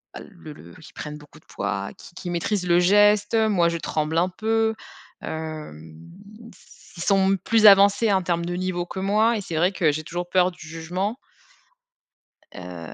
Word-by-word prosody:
bah, - - -8
le 165 -7 -12
le - - -15
qui 160 -1 -15
prennent 150 0 -7
beaucoup 150 +1 -17
de - - -32
poids, 100 0 -4
qui 175 - -15
qui 180 - -7
maîtrisent 180 +2 -2
le 175 0 +4
geste, 205 +3 +4
moi 210 -6 +2
je 170 - -3
tremble 155 0 -2
un 180 +2 +1
peu. 220 +3 0 0.5
Hem, 155 - -6 0.7
s - - -20
ils 170 - -4
sont 195 -1 +2
plus 215 +3 +4
avancés 200 +2 +6
en 190 -1 +1
termes 170 -1 -1
de 175 0 -3
niveau 180 -1 -3
que 190 - -7
moi 215 +4 +2
et - - -4
c'est 170 -4 -6
vrai 180 +4 +2
que 165 -6 +2
j'ai 155 +2 -5
toujours 175 +2 -5
peur 185 0 +3
du 155 -3 -13
jugement 180 +8 -4 1.4
heu. 90 -3 -9
180 Hz, 185 wpm, -23 LUFS, 160-200 Hz, 1.4 s, avancés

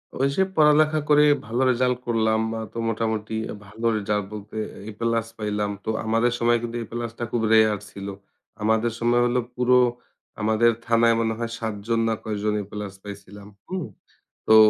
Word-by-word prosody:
ওইযে 140 +8 +2
পড়ালেখা 155 0 +5
করে 150 0 +6 0.2
ভালো 120 +3 -1
রেজাল্ট 125 0 +1
করলাম। 110 -1 +2 0.2
আ - - -3
তো - - -8
মোটামুটি 110 -1 -2 0.2
আ - - -5
ভালো 110 +3 -7
রেজাল্ট 105 0 -1
বলতে 105 +1 -8 0.3
এ - - -5
প্লাস 115 -1 0
পাইলাম। 105 -1 -1
তো - - -2 0.2
আমাদের 115 +2 +2
সময় 120 0 +3
কিন্তু 120 0 -4
এ - - -8
প্লাসটা 120 0 -4
খুব 120 - 0
রেয়ার 110 -1 +5
ছিলো। 100 0 -7 0.5
আমাদের 110 +2 +2
সময় 120 +1 +3
হলো 120 +1 +2 0.2
পুরো 125 0 +4 0.6
আমাদের 110 +2 +4 0.2
থানায় 115 0 +4
মনে 115 -1 +1
হয় 115 -1 -3
৭ 110 -2 -2
জন 115 -1 +2
না 115 - +2
কয়েকজন 105 0 -1
এ - - -5
প্লাস 105 -2 -5
পাইছিলাম, 100 0 -10 0.2
হুম? 185 -3 -3 0.6
তো 110 - +6
115 Hz, 170 wpm, -24 LUFS, 105-120 Hz, 0.6 s, করে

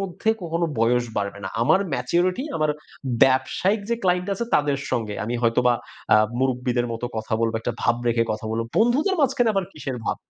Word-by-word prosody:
মধ্যে 195 +2 -4
কখনো 170 0 -1
বয়স 120 +1 +3
বাড়বে 100 -1 -2
না। 95 - -2
আমার 190 +10 +4
ম্যাচুরিটি 175 - 0
আমার 155 -1 +1 0.5
ব্যবসায়িক 135 +10 +1
যে - - +3
ক্লায়েন্ট 180 0 +1
আছে 235 - -3
তাদের 145 -2 +2
সঙ্গে। 110 -3 -1
আমি 120 - -3
হয়তোবা 120 +1 +3 0.4
আ - - +8 0.2
মুরুব্বিদের 125 -2 0
মতো 115 +2 -3
কথা 110 +1 -5
বলব, 115 -1 +1
একটা 120 - -2
ভাব 120 - +3
রেখে 115 0 +2
কথা 110 +1 -6
বলব। 115 +1 -1
বন্ধুদের 255 - +3
মাঝখানে 250 -4 +3
আবার 195 - +1
কিসের 135 -4 -5
ভাব?" - - -1
130 Hz, 180 wpm, -23 LUFS, 120-185 Hz, 0.5 s, আ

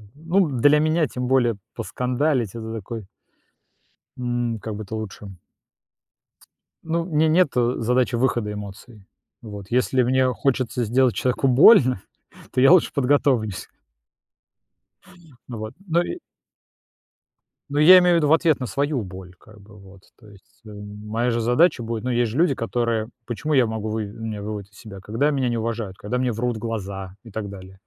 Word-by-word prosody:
ну, 170 +4 +1
для 145 +4 +4
меня, 155 +1 +2
тем 125 0 -4
более 125 -4 +2 0.2
поскандалить, 125 +1 -1
это 110 -1 -6
такой 110 -1 -7 1.1
М, 120 -2 -2
как 110 0 -6
бы 110 - -6
это 105 +2 -7
лучше 105 -1 -7 1.6
ну, 165 +1 -1
у - - -9
меня 160 -2 +1
нет, 170 +1 +4
э, 120 0 +1
задачи 125 +1 +1
выхода 120 -4 0
эмоций. 105 +1 -10 0.4
Вот. 105 -4 -9
Если 125 +1 +2
мне 130 +1 +2
хочется 125 -2 -1
сделать 125 +2 +2
человеку 130 +2 0
больно, 130 - +6 0.5
то 125 - 0
я 135 - +7
лучше 185 -2 +5
подготовлюсь. 130 -7 +1 1.8
Ну 120 - -6
вот. 110 +1 -6
Но 170 0 +2
и 350 - -4 1.5
Ну, 145 +1 -1
я 180 +5 +9
имею 180 -1 +3
в - - +4
виду 150 -2 +1
в - - +6
ответ 160 -3 +3
на 125 - -2
свою 140 +3 -1
боль, 95 -1 -10
как 110 +1 -18
бы, 105 +1 -17
вот. 95 -1 -16 0.2
То 110 - -18
есть, 100 -2 -21
э, - - -11
моя 105 +3 -4
же 115 0 -1
задача 125 +3 +3
будет 115 -1 -4
ну, - - -1
есть 120 -2 +1
же 125 - -5
люди, 155 -5 +3
которые 115 -1 -2 0.2
почему 150 +6 -3
я 130 -3 +4
могу 110 -1 -4
вы 110 -1 -2
меня 110 0 -6
выводят 105 -1 -6
из 100 - -20
себя? 100 -3 -11
Когда 115 +9 0
меня 135 -3 0
не 120 - -1
уважают, 110 -4 -4
когда 115 +5 -3
мне 125 -1 0
врут 120 +1 -2
в - - -6
глаза 100 -4 -5
и 115 - -13
так 105 0 -5
далее. 95 -1 -11
120 Hz, 175 wpm, -22 LUFS, 105-135 Hz, 1.8 s, я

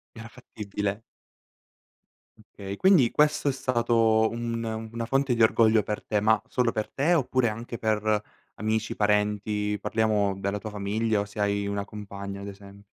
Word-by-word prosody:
Era 115 0 -9
fattibile? 105 -4 -5 1.4
Okay. 100 -2 -8
Quindi, 175 - +5
questo 150 -1 +2
è - - +2
stato 115 -4 +2
un 115 0 -3 0.3
una 115 0 -3
fonte 135 +1 +1
di 115 - +2
orgoglio 110 -1 +4
per 105 +1 -4
te. 105 -2 0
Ma 110 +1 +3
solo 125 -2 +1
per 110 -1 -3
te? 150 +9 +1
Oppure 130 -5 +1
anche 115 +2 -6
per 110 -1 +1 0.3
amici, 110 +1 -2
parenti 105 0 0
parliamo 105 -3 +1
della 100 +1 -2
tua 110 +1 -7
famiglia 105 +2 -1
o - - -1
se 105 +1 -8
hai 100 0 0
una 100 0 -2
compagna, 100 -1 -7
ad - - -7
esemp 100 0 -12
110 Hz, 155 wpm, -26 LUFS, 105-115 Hz, 1.4 s, Quindi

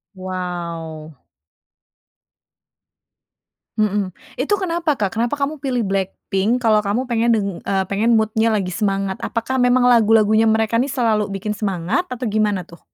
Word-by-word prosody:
Wow. 170 -4 -6 2.6
Mhm, 205 -3 0 0.2
itu 290 +10 0
kenapa, 340 -5 -1
Kak? 205 -6 -1
Kenapa 240 +4 0
kamu 290 +1 -2
pilih 255 -4 -1
BLACKPINK 195 +4 -1
kalau 215 -2 +4
kamu 210 +3 -1
pengen 235 0 +2
deng 205 -2 0
eee, 195 -1 -1
pengen 225 +4 +3
mood-nya 220 +1 +2
lagi 190 -3 -1
semangat? 195 -1 -1
Apakah 250 +3 -2
memang 245 0 +4
lagu-lagunya 225 -2 +4
mereka 220 +1 +2
ini 260 - +1
selalu 225 -6 +1
bikin 200 +1 -4
semangat 205 - -1
atau 250 -4 -6
gimana 210 -4 0
tuh? 170 0 -16
215 Hz, 135 wpm, -20 LUFS, 195-240 Hz, 2.6 s, kalau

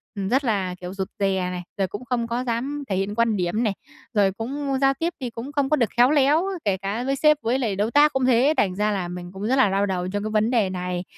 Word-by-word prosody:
ừm, 195 -1 -3
rất 265 +3 +2
là, 195 -6 -1
kiểu, 180 +1 -6
rụt 190 -1 -3
rè 190 -2 0
này, 180 0 -5
rồi 195 -2 +1
cũng 205 +7 -8
không 235 -1 -1
có 240 +2 -2
dám 260 +5 -2
thể 190 - 0
hiện 195 +2 -2
quan 230 -2 +2
điểm 180 +6 0
này, 210 -4 +1 0.4
rồi 200 -3 +3
cũng 270 +6 -3
giao 270 0 +4
tiếp 335 +4 -2
thì 250 -3 -3
cũng 235 +5 -7
không 285 -2 0
có 305 - +4
được 235 -6 +1
khéo 245 +3 +6
léo, 295 +3 +4 0.2
kể 195 -2 +1
cả 200 +5 -3
với 275 +1 0
sếp 300 +2 +4
với 245 +4 0
lại 220 -7 -1
đối 210 +4 0
tác 295 +1 +5
cũng 265 -1 +1
thế. 260 +4 +4
Thành 185 -3 +1
ra 210 +1 +1
là 190 -3 -2
mình 175 0 -7
cũng 190 +1 -7
rất 260 - +2
là 260 -7 +4
đau 195 +1 +1
đầu 180 -2 -2
trong 205 +2 -3
cái 215 - -3
vấn 215 +1 +2
đề 225 -6 +2
này, 180 -1 -3
220 Hz, 280 wpm, -23 LUFS, 195-265 Hz, 0.4 s, khéo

